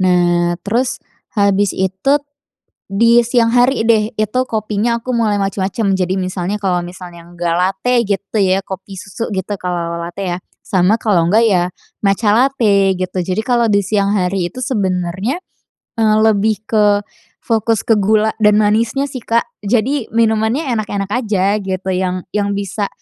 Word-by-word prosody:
Nah, 175 -1 +2
terus 240 +5 0 0.4
habis 200 -1 +2
itu 190 +11 0 0.7
di 230 +4 +4
siang 235 0 +2
hari 245 -2 +3
deh, 220 0 +3
itu 215 +2 -1
kopinya 220 0 -1
aku 250 +1 -3
mulai 215 -3 +1
macam-macam. 195 +1 -1
Jadi 190 0 -1
misalnya 185 +2 -3
kalau 180 -3 0
misalnya 175 -1 -10
enggak 170 0 -3
latte 190 +7 0
gitu 200 +1 -3
ya 190 +1 +2
kopi 195 0 -8
susu 205 +4 -6
gitu 195 +1 -3
kalau 180 -3 -3
ala-ala 170 0 -5
latte 180 -1 -3
ya, - - -5 0.3
sama 195 +2 +2
kalau 175 -7 +2
enggak 220 +3 +4
ya 180 -5 +3 0.4
matca 205 +1 +2
late 220 -6 +3
gitu. 185 0 -3
Jadi, 185 +4 -2
kalau 235 -1 +1
di 200 - +4
siang 200 0 0
hari 180 -3 0
itu 255 - -9
sebenarnya, 195 - -1 0.6
eee, 215 -1 +3
lebih 215 0 +2
ke 205 -2 +2 0.4
fokus 225 -1 0
ke 225 -2 +2
gula 215 +2 +2
dan 210 -1 +4
manisnya 225 +5 +2
sih, 280 -2 -5
Kak. 230 +1 +1 0.2
Jadi, 240 +5 0
minumannya 230 +5 +1
enak-enak 205 -3 -3
aja 210 -4 +1
gitu 190 -1 -4
yang 185 0 -2
yang 200 -1 -1
bisa, 200 +1 -3
205 Hz, 155 wpm, -16 LUFS, 185-225 Hz, 0.7 s, di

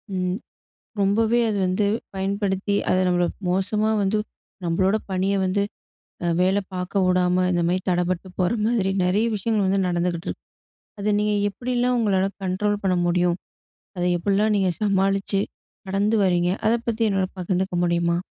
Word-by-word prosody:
ம் 180 0 -1 0.6
ரொம்பவே 220 +4 +3
அது 210 - -1
வந்து 185 +3 +1 0.3
பயன்படுத்தி, 195 +1 -1
அதை 185 - +3
நம்மள 175 -1 +2 0.2
மோசமா 205 +4 +1
வந்து 205 +2 +1 0.5
நம்பளோட 185 +4 +2 0.2
பணிய 190 +1 +1
வந்து 195 +2 +1 0.8
வேல 190 +2 +3 0.2
பாக்க 185 +2 -1
விடாம, 180 0 +2
இந்த 175 -1 +1
மாரி 180 +2 +1
தடப்பட்டு 180 +1 0
போற 180 +1 +2 0.2
மாதிரி 225 -5 +1
நெறைய 190 +5 +2
விஷயங்கள் 210 0 0
வந்து 195 +1 +2
நடந்துக்கிட்ருக்கு. 175 0 -2 0.6
அதை 205 +1 -1
நீங்க 210 0 +1 0.2
எப்படிலாம் 250 +3 0
உங்களால 195 -4 +2 0.2
கண்ட்ரோல் 205 +3 0
பண்ண 185 -2 +2
முடியும்? 175 0 +2 0.6
அதை 180 0 0
எப்படிலாம் 205 +4 +2
நீங்க 190 -2 +2
சமாளிச்சு 195 -1 +1 0.5
கடந்து 200 +3 +1
வரீங்க, 175 -1 +2 0.2
அதை 225 +2 +4
பத்தி 230 0 -1
என்னோட 195 -1 +1
பகிந்துக்க 185 +1 -1
முடியுமா? 170 0 +1
190 Hz, 140 wpm, -23 LUFS, 180-205 Hz, 0.8 s, அதை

